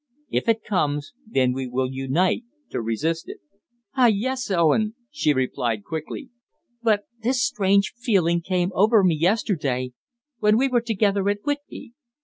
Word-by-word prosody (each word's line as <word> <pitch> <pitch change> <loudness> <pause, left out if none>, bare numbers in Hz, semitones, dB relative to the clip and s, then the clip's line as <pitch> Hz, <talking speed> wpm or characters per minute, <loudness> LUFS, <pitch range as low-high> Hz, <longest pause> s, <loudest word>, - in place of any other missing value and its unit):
If - - 0
it 225 -1 +2
comes, 145 -7 -1
then 130 - +2
we 130 0 -3
will 130 +1 -1
unite 135 - 0 0.3
to - - -2
resist 155 +9 -2
it." - - -7 0.6
"Ah, 255 -3 +5
yes, 250 +4 0
Owen," 200 +5 +2 0.2
she 290 - +1
replied 125 -5 -1
quickly, 160 - -6 0.5
"but 215 -3 +2 0.2
this 250 +3 +1
strange 200 -2 +2
feeling 190 -9 +1
came 180 +1 0
over 210 +3 +4
me 180 -3 +4
yesterday 155 - 0 0.5
when 210 0 +4
we 270 +3 +3
were 245 -2 +2
together 205 -3 +1
at 205 0 -2
Whitby. 290 -4 -5
195 Hz, 145 wpm, -24 LUFS, 150-225 Hz, 0.6 s, Ah